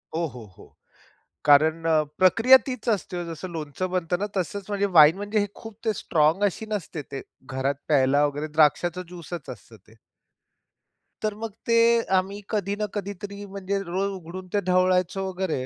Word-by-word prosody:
हो, 170 Hz, +1 st, 0 dB
हो, 125 Hz, -6 st, -8 dB
हो, -, -, -17 dB, 0.7 s
कारण 155 Hz, +3 st, +4 dB
अ, 160 Hz, -1 st, +4 dB, 0.2 s
प्रक्रिया 225 Hz, +8 st, +7 dB
तीच 255 Hz, -3 st, -5 dB
असते. 180 Hz, -5 st, -1 dB
जसं 165 Hz, +3 st, -6 dB
लोणचं 160 Hz, +3 st, -4 dB
बनत 180 Hz, -1 st, -1 dB
ना? 205 Hz, -, -1 dB
तसच 190 Hz, +2 st, -2 dB
म्हणजे 200 Hz, -1 st, 0 dB
वाईन 155 Hz, +3 st, +8 dB
म्हणजे 205 Hz, +1 st, -1 dB
खूप 225 Hz, -2 st, -11 dB
ते 220 Hz, -, +2 dB
स्ट्राँग 160 Hz, +1 st, +1 dB
अशी 205 Hz, +2 st, -1 dB
नसते. 185 Hz, -7 st, -4 dB
ते 135 Hz, -1 st, -7 dB, 0.2 s
घरात 130 Hz, +2 st, -1 dB
प्यायला 140 Hz, 0 st, +4 dB
वगैरे 145 Hz, +1 st, -3 dB
द्राक्षाच 160 Hz, +3 st, +3 dB
ज्यूसच 175 Hz, -3 st, -8 dB
असतं 115 Hz, -, -12 dB
ते. 110 Hz, +3 st, -22 dB, 1.3 s
तर 215 Hz, -1 st, -1 dB
मग 225 Hz, 0 st, -6 dB
ते, 230 Hz, 0 st, +4 dB, 0.2 s
आम्ही 195 Hz, +2 st, -2 dB
कधी 205 Hz, -2 st, -1 dB
ना 210 Hz, 0 st, -2 dB
कधीतरी 200 Hz, 0 st, -6 dB
म्हणजे 200 Hz, 0 st, -3 dB
रोज 190 Hz, +2 st, -2 dB
उघडून 185 Hz, +1 st, -9 dB
ते 205 Hz, -, +3 dB
ढवळायचं 185 Hz, 0 st, +2 dB
वगैरे, 185 Hz, -8 st, -2 dB
185 Hz, 160 wpm, -25 LUFS, 160-205 Hz, 1.3 s, वाईन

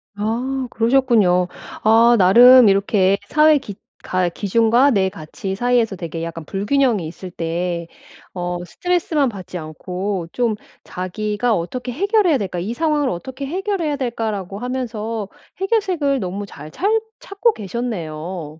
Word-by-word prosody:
아 250 Hz, +5 st, -2 dB
그러셨군요. 225 Hz, -7 st, +3 dB, 0.4 s
아 230 Hz, +2 st, +6 dB
나름 240 Hz, +5 st, +8 dB
이렇게 195 Hz, 0 st, +2 dB
사회 305 Hz, +3 st, +5 dB
기 215 Hz, -8 st, -7 dB, 0.3 s
가 185 Hz, -1 st, 0 dB
기준과 230 Hz, +8 st, +3 dB
내 195 Hz, -5 st, +2 dB
가치 190 Hz, +3 st, -6 dB
사이에서 240 Hz, -2 st, +1 dB
되게 165 Hz, -2 st, -6 dB
약간 165 Hz, -1 st, -6 dB
불균형이 205 Hz, -, 0 dB
있을 180 Hz, +2 st, -9 dB
때 170 Hz, +1 st, -3 dB, 0.5 s
어 175 Hz, 0 st, -3 dB
스트레스만 320 Hz, -, 0 dB
받지 185 Hz, -4 st, -8 dB
않고 180 Hz, +3 st, -4 dB
좀 240 Hz, -3 st, 0 dB, 0.3 s
자기가 210 Hz, +5 st, -2 dB
'어떻게 245 Hz, +9 st, -4 dB
해결해야 385 Hz, -, +2 dB
될까? 185 Hz, -5 st, -4 dB
이 210 Hz, +7 st, -4 dB
상황을 300 Hz, -2 st, +1 dB
어떻게 260 Hz, +10 st, -5 dB
해결해야 360 Hz, -2 st, -2 dB
될까?' 235 Hz, -5 st, -2 dB
라고 195 Hz, -1 st, -5 dB
하면서 230 Hz, -4 st, -4 dB, 0.3 s
해결책을 370 Hz, -, 0 dB
너무 195 Hz, 0 st, -4 dB
잘 150 Hz, -5 st, -11 dB
찰 420 Hz, -, 0 dB, 0.2 s
찾고 415 Hz, +3 st, 0 dB
계셨네요. 175 Hz, -7 st, -5 dB
220 Hz, 295 characters per minute, -20 LUFS, 180-260 Hz, 0.5 s, 나름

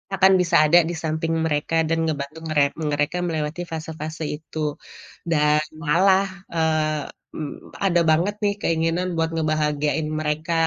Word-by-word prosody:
akan 190 Hz, 0 st, +5 dB
bisa 170 Hz, -, +1 dB, 0.2 s
ada 175 Hz, -, +8 dB
di 175 Hz, -, -3 dB
samping 160 Hz, +1 st, -1 dB
mereka 150 Hz, +1 st, -1 dB
dan 165 Hz, 0 st, +1 dB
ngebantu 150 Hz, +1 st, -4 dB
mere 150 Hz, -2 st, +4 dB
mereka 150 Hz, +2 st, -1 dB
melewati 160 Hz, 0 st, -2 dB
fase-fase 160 Hz, 0 st, -5 dB
itu, 150 Hz, -1 st, -4 dB, 0.6 s
dan 150 Hz, -1 st, +3 dB, 0.2 s
malah, 190 Hz, +5 st, +4 dB, 0.3 s
eee, 155 Hz, -2 st, +1 dB, 0.3 s
mmm, 150 Hz, -2 st, -7 dB
ada 175 Hz, -2 st, +3 dB
banget 175 Hz, +7 st, +2 dB
nih 205 Hz, -1 st, +2 dB
keinginan 165 Hz, +2 st, 0 dB
buat 165 Hz, 0 st, +1 dB
ngebahagiain 150 Hz, -1 st, 0 dB
mereka 155 Hz, +2 st, -2 dB
160 Hz, 135 wpm, -23 LUFS, 150-165 Hz, 0.6 s, ada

